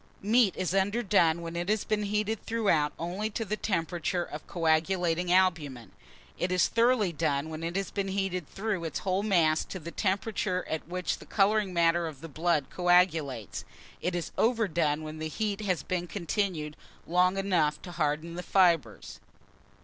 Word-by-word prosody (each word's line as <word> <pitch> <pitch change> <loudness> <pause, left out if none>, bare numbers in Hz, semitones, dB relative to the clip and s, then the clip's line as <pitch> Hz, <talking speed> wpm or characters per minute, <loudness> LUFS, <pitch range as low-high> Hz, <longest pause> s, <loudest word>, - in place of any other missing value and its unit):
Meat 220 -1 +4
is 185 -1 -1
underdone 195 -4 +2
when 165 0 -6
it 175 +2 -2
has 215 0 +1
been 215 -1 0
heated 210 +1 -1
throughout 200 -10 +1
only 185 +6 -3
to 225 +1 -3
the 210 +1 -1
temperature 175 -3 -1
of 150 -2 -8
coagulating 170 +1 +1
albumen: 155 - +1 0.5
it 180 - 0
is 180 -1 +3
thoroughly 230 -5 +2
done 155 -1 -1
when 155 0 -6
it 170 +2 -4
has 195 0 -2
been 200 -1 -2
heated 190 -4 -2
through 200 -3 -3
its 160 -3 -3
whole 190 0 0
mass 170 -7 +3
to - - -7
the 170 -1 -8
temperature 195 -1 -1
at 160 -1 -4
which 180 +1 -2
the - - -12
colouring 205 -1 +2
matter 170 -1 +2
of 145 -4 -9
the 165 - -7
blood 160 -1 0
coagulates: 165 - +1 0.4
it 180 0 -1
is 175 - -3
overdone 170 -10 +1
when 155 0 -7
the 155 - -3
heat 210 +4 -2
has 185 -8 -1
been 175 -1 -2
continued 170 -4 -2 0.3
long 180 +2 +2
enough 170 -6 +1
to 180 - -8
harden 155 0 -1
the 175 - -4
fibres. 170 - +1
180 Hz, 170 wpm, -29 LUFS, 160-195 Hz, 0.5 s, Meat